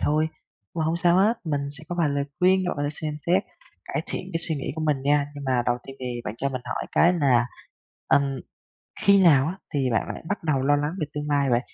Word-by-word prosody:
thôi, 155 Hz, +2 st, +2 dB, 0.5 s
mà 160 Hz, -2 st, -1 dB
hông 160 Hz, +1 st, +1 dB
sao 175 Hz, 0 st, +3 dB
hết, 210 Hz, +5 st, +4 dB
mình 150 Hz, -3 st, -1 dB, 0.2 s
sẽ 160 Hz, -, -11 dB
có 175 Hz, -, -3 dB
vài 160 Hz, -, +3 dB
lời 140 Hz, 0 st, 0 dB
khuyên 185 Hz, +1 st, +4 dB
bạn -, -, -2 dB
có 145 Hz, -, -2 dB
thể 145 Hz, -, 0 dB
xem 150 Hz, 0 st, -4 dB
xét, 185 Hz, +4 st, +3 dB, 0.4 s
cải -, -, -3 dB
thiện -, -, -4 dB
cái 165 Hz, -, 0 dB
suy 160 Hz, -, 0 dB
nghĩ 135 Hz, -, -4 dB
của 160 Hz, -, -4 dB
mình 145 Hz, -3 st, +1 dB
nha. 145 Hz, +1 st, +2 dB
Nhưng 145 Hz, -, -7 dB
mà 130 Hz, -2 st, +1 dB
đầu 120 Hz, 0 st, +1 dB
tiên 135 Hz, -, -9 dB
thì 125 Hz, -2 st, -4 dB
bạn 105 Hz, -, -4 dB
cho 140 Hz, +3 st, -1 dB
mình 130 Hz, -2 st, -5 dB
hỏi -, -, -4 dB
cái 175 Hz, +2 st, +5 dB
là, 130 Hz, -8 st, +3 dB, 0.6 s
ừm, 140 Hz, -2 st, +2 dB, 0.6 s
khi 200 Hz, -1 st, +5 dB
nào 140 Hz, -5 st, +6 dB
á, 180 Hz, +4 st, -4 dB, 0.2 s
thì 135 Hz, -3 st, +1 dB
bạn 115 Hz, -3 st, +1 dB
lại -, -, -6 dB
bắt 200 Hz, -3 st, -3 dB
đầu 140 Hz, -5 st, +1 dB
lo 145 Hz, +2 st, +3 dB
lắng 145 Hz, +2 st, -1 dB
về 155 Hz, -, 0 dB
tương 150 Hz, 0 st, -3 dB
lai 140 Hz, -2 st, +2 dB
vậy? 120 Hz, 0 st, +3 dB
145 Hz, 255 wpm, -25 LUFS, 135-165 Hz, 0.6 s, nào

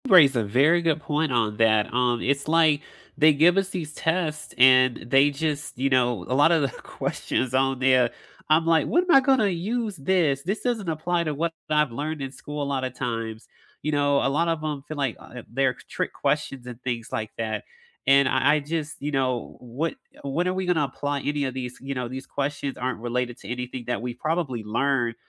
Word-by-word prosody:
You 225 Hz, -, +3 dB
raise 140 Hz, -6 st, +7 dB
a 115 Hz, -, +1 dB
very 140 Hz, +12 st, +3 dB
good 160 Hz, -2 st, +1 dB
point 150 Hz, +1 st, -1 dB
on 110 Hz, -4 st, 0 dB
that, 110 Hz, -1 st, +4 dB
um, 120 Hz, -1 st, +1 dB
it's, 140 Hz, +2 st, 0 dB
like, 155 Hz, -2 st, +4 dB, 0.4 s
they 155 Hz, 0 st, +6 dB
give 170 Hz, +6 st, +4 dB
us 195 Hz, -1 st, +1 dB
these 165 Hz, -6 st, -5 dB
tests 160 Hz, -2 st, -2 dB
and 130 Hz, -1 st, +6 dB
they 135 Hz, +3 st, +5 dB
just, 150 Hz, -1 st, -3 dB
you 135 Hz, +2 st, +1 dB
know, 120 Hz, -7 st, +2 dB
a -, -, -1 dB
lot 145 Hz, +5 st, +5 dB
of 165 Hz, -2 st, +3 dB
the 135 Hz, -, +1 dB
questions 125 Hz, 0 st, -3 dB
on 135 Hz, 0 st, +2 dB
there, 130 Hz, -2 st, +4 dB, 0.4 s
I'm 160 Hz, +2 st, +4 dB
like, 165 Hz, -1 st, +3 dB
"When 350 Hz, -, +3 dB
am 360 Hz, -, 0 dB
I -, -, +9 dB
gonna 265 Hz, -5 st, +3 dB
use 210 Hz, +5 st, -2 dB
this? 145 Hz, -2 st, +1 dB
This 200 Hz, +5 st, -2 dB
doesn't 225 Hz, -7 st, -1 dB
apply 170 Hz, +2 st, -1 dB
to 155 Hz, -, -1 dB
what 165 Hz, +3 st, -1 dB, 0.2 s
I've 150 Hz, -3 st, +2 dB
learned 150 Hz, +5 st, -4 dB
in 135 Hz, -1 st, -4 dB
school 150 Hz, +1 st, -6 dB
a -, -, -2 dB
lot 140 Hz, -2 st, -2 dB
of 130 Hz, -1 st, -3 dB
times." 115 Hz, -3 st, -4 dB, 0.4 s
You 155 Hz, -, -1 dB
know, 145 Hz, -1 st, +2 dB
a -, -, +3 dB
lot 160 Hz, +5 st, +1 dB
of 165 Hz, -2 st, -1 dB
'em 150 Hz, -3 st, -3 dB
feel 155 Hz, -, -6 dB
like, 135 Hz, -5 st, -1 dB
uh, 125 Hz, -1 st, -11 dB
they're 130 Hz, +1 st, +1 dB
trick -, -, -3 dB
questions 135 Hz, -4 st, -2 dB
and 125 Hz, -1 st, -9 dB
things 120 Hz, -3 st, -4 dB
like 110 Hz, -1 st, -3 dB
that, 110 Hz, -2 st, -3 dB, 0.4 s
and 140 Hz, 0 st, +6 dB
I 130 Hz, +3 st, +3 dB
I -, -, +1 dB
just 155 Hz, +1 st, -4 dB
you 145 Hz, +1 st, -2 dB
know, 130 Hz, -3 st, -1 dB
what 130 Hz, +7 st, -3 dB, 0.3 s
when 150 Hz, +6 st, -1 dB
are 185 Hz, -, 0 dB
we 190 Hz, 0 st, -2 dB
gonna 175 Hz, -4 st, +2 dB
apply 145 Hz, +1 st, -3 dB
any 145 Hz, +1 st, -1 dB
of 130 Hz, -, -3 dB
these, 125 Hz, -1 st, -6 dB
you 135 Hz, +1 st, -4 dB
know, 125 Hz, -2 st, -3 dB
these 130 Hz, +2 st, -7 dB
questions 140 Hz, -1 st, -3 dB
aren't 125 Hz, -2 st, -3 dB
related 120 Hz, +1 st, -2 dB
to 100 Hz, -, -12 dB
anything 125 Hz, 0 st, -5 dB
that 125 Hz, -, -2 dB
we've 120 Hz, 0 st, -5 dB
probably 155 Hz, -8 st, -2 dB
learned, 120 Hz, +2 st, 0 dB
140 Hz, 220 wpm, -25 LUFS, 125-155 Hz, 0.4 s, I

